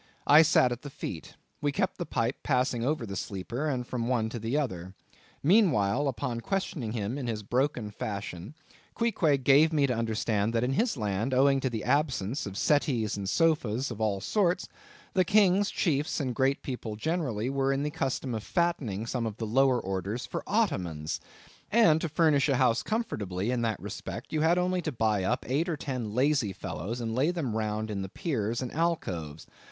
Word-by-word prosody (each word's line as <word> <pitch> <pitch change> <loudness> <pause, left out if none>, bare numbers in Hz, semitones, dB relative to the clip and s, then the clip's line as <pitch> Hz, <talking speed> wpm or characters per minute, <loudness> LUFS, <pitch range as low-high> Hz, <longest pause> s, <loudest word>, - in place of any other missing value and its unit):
I 150 +2 +8
sat 130 -5 +4
at 120 +1 -4
the 145 - -7
feet. 85 -10 -7 0.3
We 145 -1 +1
kept 190 +7 -1
the 175 - -3
pipe 115 +3 -1
passing 125 -3 +1
over 140 -2 0
the 100 -2 -6
sleeper, 125 +9 -3
from 120 -1 -3
one 120 -3 +1
to 120 - -5
the 115 +6 -1
other. 95 - -3 0.5
Meanwhile, 145 - +3
upon 120 -2 -2
questioning 145 - -2
him 115 +4 -2
in 125 - -4
his 110 -2 -3
broken 120 -1 -1
fashion, 100 - -5 0.4
Queequeg 160 - +1
gave 145 +5 +6
me 150 -3 +3
to 130 - 0
understand 110 -1 0
that, 115 - +2
in 130 +2 0
his 225 - +1
land, 105 +4 -1
owing 135 +1 +4
to 130 - -1
the 115 -3 -4
absence 135 -2 0
of 100 0 -7
settees 125 -8 +1
and 100 -1 -3
sofas 135 - +1
of 110 -1 -6
all 105 -3 +1
sorts, 180 - +1 0.5
the 185 - +4
king, 200 0 +4
chiefs, 155 -8 0
and 130 -4 -1
great 135 +3 +1
people 120 -5 -5
generally, 125 -4 -1
were 135 0 +1
in 135 +1 0
the 150 - -2
custom 130 -2 -2
of 110 - -2
fattening 135 - -1
some 115 0 -2
of 105 -1 -6
the 115 - -3
lower 130 +3 +3
orders 95 +4 -3
for - - -4
ottomans; 90 - -1 0.5
and 170 -8 +5
to 165 - -2
furnish 150 -3 +3
a 135 - +3
house 125 -2 +3
comfortably 105 - -2
in 125 -1 0
that 110 -3 -1
respect, - - -7
you 155 - +1
had 165 +3 +4
only 180 0 +1
to 160 - -3
buy 110 -5 +1
up 120 +6 -1
eight 150 +7 0
or 160 - -1
ten 125 -7 -4
lazy 130 -6 +2
fellows, 95 +8 -5
and 115 -2 -3
lay 135 +7 +2
them 155 -11 -2
round 110 0 -2
in 100 -2 -3
the 95 - -5
piers 120 - -2
and 125 - -5
alcoves. 90 - -2
125 Hz, 190 wpm, -29 LUFS, 110-150 Hz, 0.5 s, I